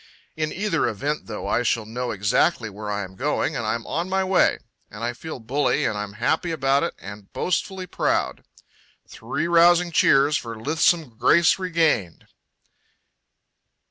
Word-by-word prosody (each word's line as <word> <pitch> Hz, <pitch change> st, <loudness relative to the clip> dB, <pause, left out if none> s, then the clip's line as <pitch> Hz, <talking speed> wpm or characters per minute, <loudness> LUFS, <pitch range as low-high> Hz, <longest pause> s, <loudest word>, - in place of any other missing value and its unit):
In 155 Hz, -1 st, -2 dB
either 195 Hz, -4 st, 0 dB
event, 145 Hz, +8 st, -3 dB
though, 105 Hz, -2 st, -6 dB
I -, -, +1 dB
shall 115 Hz, -2 st, 0 dB
know 120 Hz, +3 st, -4 dB
exactly 110 Hz, -, +1 dB
where 105 Hz, +1 st, -7 dB
I 105 Hz, 0 st, -2 dB
am 95 Hz, 0 st, -10 dB
going 150 Hz, +6 st, -1 dB
and 115 Hz, -4 st, -3 dB
I'm 115 Hz, +2 st, -2 dB
on 170 Hz, +4 st, -3 dB
my 190 Hz, 0 st, +1 dB
way. 185 Hz, -1 st, +3 dB, 0.3 s
And 105 Hz, +2 st, -9 dB
I 120 Hz, +1 st, -1 dB
feel 160 Hz, +5 st, -8 dB
bully 130 Hz, +6 st, 0 dB
and -, -, 0 dB
I'm 105 Hz, -1 st, -5 dB
happy 155 Hz, +10 st, 0 dB
about 140 Hz, -3 st, +1 dB
it 170 Hz, -, -2 dB
and 100 Hz, 0 st, -11 dB
boastfully 185 Hz, +1 st, -2 dB
proud. -, -, -1 dB, 0.6 s
Three 170 Hz, -, -4 dB
rousing 175 Hz, +1 st, +5 dB
cheers 150 Hz, -4 st, +4 dB
for 115 Hz, -2 st, -7 dB
lithesome 155 Hz, -1 st, +1 dB
grace 170 Hz, +3 st, +4 dB
regained! 165 Hz, -, 0 dB
140 Hz, 155 wpm, -23 LUFS, 110-170 Hz, 0.6 s, rousing